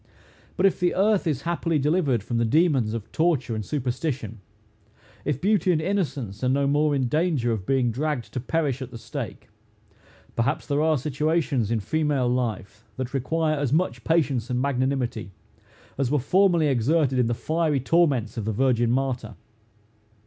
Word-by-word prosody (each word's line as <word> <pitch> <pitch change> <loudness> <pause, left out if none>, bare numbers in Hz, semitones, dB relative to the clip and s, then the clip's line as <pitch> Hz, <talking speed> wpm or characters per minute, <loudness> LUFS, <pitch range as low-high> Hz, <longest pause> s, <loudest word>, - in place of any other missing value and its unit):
But 190 - +3
if 195 - +3
the 180 -1 +1
earth 200 -1 +2
is 140 -4 -1
happily 170 -1 0
delivered 145 - +1
from 115 +2 -2
the - - +2
demons 130 -4 +2
of 110 -3 -7
torture 155 -8 +1
and 110 -1 -3
superstition; 125 - -3 0.8
if 145 -2 -1
beauty 195 -1 +2
and 165 - +2
innocence 150 - -2
are 125 - +2
no 140 +2 +2
more 145 +1 +2
in 130 -2 0
danger 150 -4 +1
of 105 -5 -3
being 130 -3 +2
dragged 140 0 -3
to 130 - -2
perish 140 0 -1
at 130 - -5
the 115 - -9
stake 115 -1 -7 0.9
perhaps 115 - 0
there 145 0 0
are 155 -1 +3
situations, 150 -3 0
in 115 -2 0
female 150 0 0
life, 115 -3 -3
that 130 0 -4
require 155 +3 0
as 140 -4 -1
much 150 -7 0
patience 135 -7 +1
and 125 -1 0
magnanimity, 130 -6 -1 0.7
as 135 -3 +1
were 150 - +2
formerly 175 +3 +3
exerted 135 +1 +2
in 125 - +3
the 120 - 0
fiery 155 +1 0
torments 135 -5 +1
of 110 - -3
the 110 - 0
virgin 120 0 +2
martyr. 125 -4 -1
135 Hz, 170 wpm, -25 LUFS, 120-155 Hz, 0.9 s, But